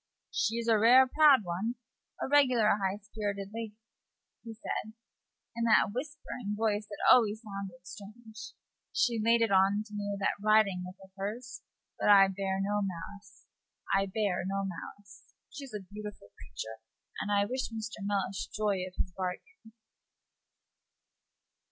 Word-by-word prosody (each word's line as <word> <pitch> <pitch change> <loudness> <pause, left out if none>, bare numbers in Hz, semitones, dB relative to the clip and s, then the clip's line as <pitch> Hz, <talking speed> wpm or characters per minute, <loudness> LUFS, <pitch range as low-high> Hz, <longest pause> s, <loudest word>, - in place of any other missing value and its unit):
"She's 230 +1 -1
a 225 -2 +4
rare 250 +4 +7
proud 285 -1 +6
one 190 +7 -3 0.4
a - - -2
regular 255 -6 +4
high 190 +1 0
spirited 200 -1 -4
lady," 225 -2 -6 0.7
he 225 -1 -8
said, 220 0 -4 0.6
in 235 0 -1
that 220 -3 +4
whispering 255 -5 -5
voice 210 -1 0
that 205 - -8
always 220 -3 +4
sounded 195 -4 -8
strange. 220 +2 -11 0.4
"She 235 -3 +1
laid 230 +1 +4
in 225 - 0
on 195 +2 +4
me 205 -1 -4
with 200 -1 -3
that 200 - 0
riding 215 -4 +4
whip 180 0 -8
of 190 - -16
hers; 230 +5 -5 0.4
but - - +2
I 195 -1 +8
bear 190 0 -2
no 205 +1 0
malice 195 +2 -7 0.5
I 195 0 +3
bear 195 -2 -1
no 195 +2 -2
malice. 200 +2 -10 0.2
She's 275 -3 -9
a 210 - -4
beautiful 210 - -8
creature, 110 - -8 0.4
and 205 - -3
I 200 0 +3
wish 255 +4 -3
Mr. 225 0 -6
Mellish 195 -1 -2
joy 210 -2 -1
of 185 - -12
his 185 - -2
bargain." 185 +3 -6
210 Hz, 145 wpm, -30 LUFS, 195-225 Hz, 0.7 s, I